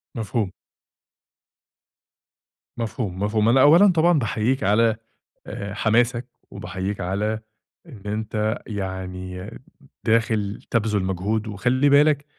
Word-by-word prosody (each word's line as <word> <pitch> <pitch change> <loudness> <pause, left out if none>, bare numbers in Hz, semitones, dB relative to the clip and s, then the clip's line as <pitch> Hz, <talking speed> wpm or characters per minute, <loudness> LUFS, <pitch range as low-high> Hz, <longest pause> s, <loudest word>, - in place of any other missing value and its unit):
مفهوم. 110 -3 -2 2.3
مفهوم، 110 -5 -4
مفهوم. 105 +1 +2
أنا 130 +2 +5
أوّلًا 175 +7 +7
طبعًا 170 -1 +3
باحيّيك 120 +3 0
على 110 +2 +3 0.5
آآ 100 0 -6
حماسك، 120 +3 +1 0.2
وباحيّيك 95 +3 -5
على 105 +4 -1 0.5
إن 120 -10 -12
أنت 110 +1 -2
يعني 95 -1 -5 0.5
داخل 110 -3 +1
تَبذُل 105 -4 0
مجهود، 100 +4 -2
وخلّي 125 +7 +1
بالك 145 0 +4
110 Hz, 95 wpm, -23 LUFS, 100-120 Hz, 2.3 s, أوّلًا